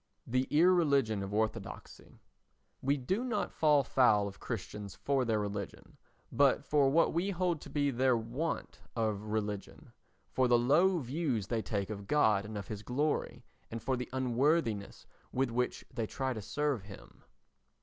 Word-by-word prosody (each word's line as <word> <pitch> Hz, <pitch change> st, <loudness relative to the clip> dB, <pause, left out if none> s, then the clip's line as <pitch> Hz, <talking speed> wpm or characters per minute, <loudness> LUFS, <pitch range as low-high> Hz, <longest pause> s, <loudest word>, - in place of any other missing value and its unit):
The 130 Hz, +2 st, 0 dB
Irreligion 145 Hz, -, +3 dB
of 95 Hz, 0 st, -5 dB
Orthodoxy 110 Hz, -1 st, -4 dB, 0.6 s
We 140 Hz, +2 st, +1 dB
do 190 Hz, -, -1 dB
not 235 Hz, -5 st, -1 dB
fall 150 Hz, -3 st, +4 dB
foul 105 Hz, -7 st, +3 dB
of 95 Hz, -, -9 dB
Christians 105 Hz, -2 st, -6 dB
for 130 Hz, +7 st, 0 dB
their 110 Hz, -2 st, +1 dB
religion, 100 Hz, -2 st, -5 dB, 0.4 s
but 140 Hz, 0 st, +3 dB
for 145 Hz, -2 st, +3 dB
what 165 Hz, +5 st, +3 dB
we 175 Hz, +4 st, 0 dB
hold 180 Hz, -4 st, 0 dB
to -, -, -10 dB
be 145 Hz, -1 st, +1 dB
their 130 Hz, 0 st, +2 dB
want 120 Hz, +9 st, -4 dB, 0.2 s
of 110 Hz, -3 st, 0 dB
religion—for 105 Hz, +4 st, -4 dB
the 120 Hz, 0 st, +5 dB
low 160 Hz, +10 st, +4 dB
views 135 Hz, -, -1 dB
they 115 Hz, +2 st, -1 dB
take 100 Hz, -1 st, -3 dB
of 100 Hz, -2 st, -7 dB
God 110 Hz, -8 st, +3 dB
and 105 Hz, 0 st, -6 dB
of 100 Hz, -, -6 dB
his 105 Hz, -2 st, -6 dB
glory, 145 Hz, +7 st, -2 dB, 0.2 s
and 115 Hz, -, -5 dB
for 130 Hz, +4 st, -1 dB
the 125 Hz, 0 st, -5 dB
unworthiness 130 Hz, -3 st, 0 dB, 0.3 s
with 130 Hz, -1 st, 0 dB
which 125 Hz, +1 st, -1 dB
they 115 Hz, -3 st, -2 dB
try 130 Hz, +2 st, -2 dB
to 110 Hz, -, -6 dB
serve 145 Hz, +2 st, -1 dB
him. 100 Hz, 0 st, -13 dB
125 Hz, 160 wpm, -32 LUFS, 105-145 Hz, 0.6 s, the